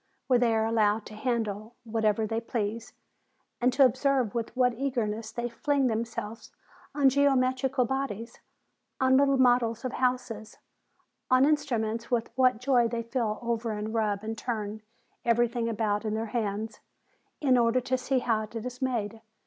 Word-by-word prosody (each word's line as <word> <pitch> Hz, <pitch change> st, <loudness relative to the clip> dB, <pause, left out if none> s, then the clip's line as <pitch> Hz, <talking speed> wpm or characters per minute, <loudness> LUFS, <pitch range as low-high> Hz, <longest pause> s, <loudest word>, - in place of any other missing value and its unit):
where 250 Hz, -2 st, +3 dB
they 235 Hz, -2 st, +2 dB
are 220 Hz, 0 st, +2 dB
allowed 220 Hz, -1 st, +2 dB
to -, -, -10 dB
handle 220 Hz, -1 st, -3 dB
whatever 220 Hz, -1 st, 0 dB
they 225 Hz, +2 st, -2 dB
please, 230 Hz, 0 st, -3 dB, 0.7 s
and 250 Hz, +1 st, +4 dB
to 270 Hz, +2 st, +5 dB
observe 260 Hz, -2 st, +1 dB
with 230 Hz, -1 st, -2 dB
what 250 Hz, -1 st, +3 dB
eagerness 230 Hz, -4 st, -2 dB
they 240 Hz, +1 st, -3 dB
fling 275 Hz, +4 st, 0 dB
themselves 225 Hz, -1 st, -3 dB, 0.4 s
on 285 Hz, -2 st, +4 dB
geometrical 265 Hz, -1 st, +2 dB
bodies, 250 Hz, -3 st, -4 dB, 0.6 s
on 260 Hz, -1 st, +4 dB
little 275 Hz, 0 st, +4 dB
models 245 Hz, -2 st, +3 dB
of 255 Hz, -, -3 dB
houses, 250 Hz, -4 st, -2 dB, 0.7 s
on 255 Hz, 0 st, +5 dB
instruments; 235 Hz, -7 st, 0 dB
with 240 Hz, -3 st, 0 dB
what 255 Hz, -2 st, +4 dB
joy 250 Hz, -2 st, +3 dB
they 230 Hz, 0 st, -3 dB
feel 230 Hz, -2 st, -2 dB
over 230 Hz, -1 st, -1 dB
and 210 Hz, +1 st, -4 dB
rub 210 Hz, -3 st, 0 dB
and 220 Hz, 0 st, -4 dB
turn 215 Hz, -3 st, -4 dB, 0.4 s
everything 235 Hz, 0 st, +1 dB
about 210 Hz, -2 st, -1 dB
in 215 Hz, -1 st, -2 dB
their 220 Hz, +1 st, -2 dB
hands, 215 Hz, -1 st, -2 dB, 0.6 s
in 265 Hz, -4 st, +3 dB
order 240 Hz, +1 st, +3 dB
to 255 Hz, +1 st, -1 dB
see 260 Hz, +1 st, 0 dB
how 230 Hz, -3 st, +1 dB
it 215 Hz, +2 st, -9 dB
is 245 Hz, +3 st, -6 dB
made. 225 Hz, -4 st, -2 dB
235 Hz, 155 wpm, -28 LUFS, 220-255 Hz, 0.7 s, to